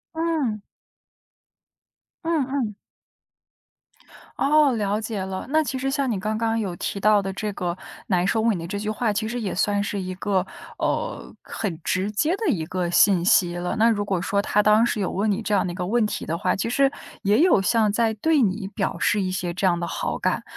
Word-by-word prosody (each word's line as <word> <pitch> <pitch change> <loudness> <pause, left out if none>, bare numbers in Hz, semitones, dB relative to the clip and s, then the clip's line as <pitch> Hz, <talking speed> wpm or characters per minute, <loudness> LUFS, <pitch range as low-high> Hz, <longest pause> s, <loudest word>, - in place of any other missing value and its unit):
嗯。 310 -11 -1 1.6
嗯 325 -5 +1
嗯。 245 -7 -2 1.6
哦， 295 -1 +4
了 210 -1 -1
解 220 -2 -4
了。 190 +2 -5
那 315 +2 +3
其 260 -2 -3
实 270 +1 -1
像 275 -3 0
你 200 - -1
刚 215 +3 -2
刚 225 0 0
有 190 -5 -3
提 200 - -4
到 210 +1 +4
的 195 0 -3
这 210 +1 -3
个 175 -2 -3 0.3
难 180 -2 +1
收 225 - +1
尾 225 -2 +2
的 170 -1 -5
这 200 +2 -4
句 210 +1 -4
话， 215 +1 0
其 220 +1 -2
实 240 +1 -3
也 200 -4 -3
算 205 +1 +1
是 205 0 -3
一 185 0 -4
个， 190 -1 0 0.3
呃， - - -2
很 180 -6 -4
直 190 +3 0
接 310 - +1
的 440 +2 -4
一 165 -6 -2
个 180 -1 -2
信 180 -1 +4
息 175 -2 +4
了。 175 +3 -2
那 230 +1 +5
如 205 -2 0
果 190 -3 -1
说 200 +1 0
他 210 +1 +2
当 210 +2 +5
时 215 - -1
有 195 - 0
问 205 +2 0
你 200 - -1
这 210 -2 0
样 190 - +2
的 175 - -3
一 - - -6
个 180 -1 -3
问 230 +1 +2
题 - - -3
的 165 +1 -2
话， 205 - 0
其 195 - -2
实 275 +3 +3 0.3
也 205 +5 +3
有 345 - +5
像 215 0 +3
在 225 +1 +1
对 305 +8 +2
你 195 0 -1
表 190 - -2
示 210 - +2
一 185 - -2
些 180 -1 -2
这 190 - -1
样 175 -2 +2
的 170 - -3
好 - - -3
感。 - - 0
210 Hz, 235 characters per minute, -24 LUFS, 190-230 Hz, 1.6 s, 那